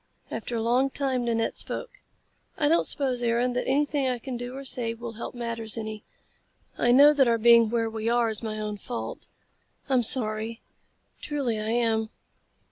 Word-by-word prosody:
After 240 - -4
a 225 - -1
long 250 +4 +2
time 260 -3 -1
Nanette 230 -1 -1
spoke. - - -3 0.7
"I 290 - +2
don't 330 +3 +3
suppose, 260 -4 -1
Aaron, 240 +1 +1
that 250 - -2
anything 285 0 +1
I 250 - -1
can 250 +2 -6
do 245 +1 -6
or 275 - -8
say 235 -3 -3
will 235 0 -7
help 230 +2 -7
matters 230 -2 -4
any. 215 -1 -5 0.7
I 240 - +2
know 285 +4 +7
that 275 -3 +3
our 230 -1 +3
being 230 0 +6
where 230 0 0
we 220 0 -3
are 235 -1 +2
is 220 - -4
my 215 -2 -4
own 210 -1 -4
fault. 240 +4 -6 0.6
I'm 260 -2 +3
sorry. 225 -1 +3 0.6
Truly 270 -7 -2
I 215 +1 -3
am." 225 -2 +1
235 Hz, 180 wpm, -26 LUFS, 225-255 Hz, 0.7 s, know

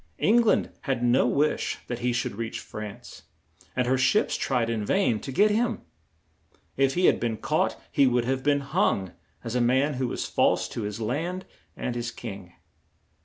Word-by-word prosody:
Eng 235 +3 +4
land 230 - +2
had 130 -3 -1
no 120 +2 +4
wish 145 +5 +1
that 120 -1 -4
he 125 0 0
should 120 0 -1
reach 115 +1 -4
France, 105 -2 -9 0.5
and 125 - +1
her 130 +1 +1
ships 130 - +2
tried 125 -4 0
in 115 -2 -1
vain 120 - +1
to 135 - -7
get 210 +10 +4
him. 230 +3 0 0.9
If 135 0 +2
he 180 +1 +3
had - - +4
been 115 -2 -1
caught - - 0
he 140 - +4
would 120 -1 +2
have 130 +1 0
been 145 +1 +2
hung, 95 -8 0 0.3
as 115 - -4
a 125 - +1
man 130 +5 +2
who 130 - +1
was - - -3
false - - +2
to - - -5
his 105 +1 -4
land 165 +12 -2 0.3
and 125 - -3
his 120 0 -3
king. 100 -6 -8
125 Hz, 185 wpm, -26 LUFS, 115-140 Hz, 0.9 s, Eng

